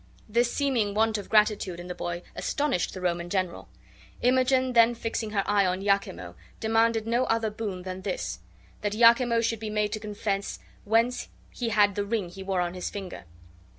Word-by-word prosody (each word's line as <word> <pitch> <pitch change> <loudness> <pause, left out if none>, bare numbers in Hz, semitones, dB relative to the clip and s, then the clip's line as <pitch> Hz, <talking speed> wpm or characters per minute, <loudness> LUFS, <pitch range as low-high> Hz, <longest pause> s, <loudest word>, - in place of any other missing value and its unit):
This 235 +2 +2
seeming 240 -8 0
want 220 0 +2
of 200 - -9
gratitude 210 -5 +2
in 175 - -7
the 180 - -5
boy 175 0 -4
astonished 285 - -1
the 185 - -6
Roman 175 -1 -1
general. 185 -2 -2 0.5
Imogen 255 +1 +3
then, 235 0 +5
fixing 225 -1 -3
her 205 -2 0
eye 205 -1 +3
on 185 0 0
Iachimo, 90 - 0 0.3
demanded 225 0 +2
no 240 +3 +1
other 225 -1 0
boon 205 -4 -5
than 185 0 -6
this: - - -3 0.4
that 205 -1 -1
Iachimo 235 +1 +5
should 230 -1 0
be 220 0 -4
made 210 -1 0
to 215 - -3
confess 205 -1 -3 0.3
whence 230 +4 +1 0.2
he 240 -2 -3
had 205 -2 +4
the 205 - -1
ring 200 -3 -2
he 190 +2 -10
wore 190 -1 -1
on 175 0 -2
his 180 -1 -4
finger. 190 - -7
210 Hz, 185 wpm, -27 LUFS, 190-230 Hz, 0.5 s, then